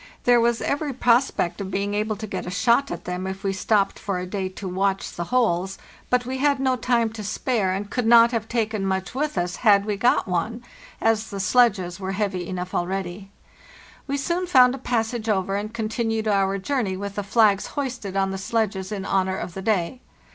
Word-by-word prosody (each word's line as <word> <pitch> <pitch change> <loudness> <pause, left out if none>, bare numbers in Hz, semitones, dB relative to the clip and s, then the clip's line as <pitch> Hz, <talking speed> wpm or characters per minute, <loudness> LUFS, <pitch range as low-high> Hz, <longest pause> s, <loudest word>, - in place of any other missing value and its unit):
There 245 -1 +5
was 235 0 +1
every 285 0 -1
prospect 240 -7 +2
of 190 - -4
being 200 +2 -2
able 215 +1 -1
to 215 +2 -6
get 200 - -5
a - - -2
shot 235 +9 +2
at - - -6
them 180 +1 -3
if 190 +1 -6
we 195 -1 0
stopped 195 +1 +1
for 195 -2 -2
a 180 - -3
day 190 0 -3
to 190 +1 -7
watch 195 +1 -1
the 175 - -5
holes; 195 -4 +1 0.3
but 250 0 +2
we 260 +1 -3
had 285 0 +2
no 260 -1 +2
time 235 -2 +1
to 220 -2 -6
spare, 215 -1 0
and 195 +2 -3
could 245 -3 -1
not 230 0 +7
have 225 -2 -2
taken 220 -3 -1
much 190 -1 -2
with 295 0 -2
us 175 0 -1
had 205 -3 +4
we 210 -1 -2
got 240 +1 +2
one, 215 +7 -2 0.4
as 220 -1 +1
the 200 - -5
sledges 195 -5 +2
were 190 0 -3
heavy 190 -3 -2
enough 180 -1 -5
already. 190 +1 -3 0.8
We 280 0 -1
soon 345 +6 -1
found 255 -6 +6
a 270 - -6
passage 230 -2 -1
over, 195 -1 0
and 210 +2 -3
continued 225 0 -2
our 195 -1 +2
journey 200 -3 -1
with 200 0 -5
the 205 - -2
flags 205 -1 +3
hoisted 245 -8 -3
on 195 0 +1
the 190 - -4
sledges 195 -2 -1
in 195 -2 -4
honor 190 -1 0
of 175 - -5
the 190 - -6
day. 200 +3 -1
205 Hz, 210 wpm, -24 LUFS, 190-235 Hz, 0.8 s, not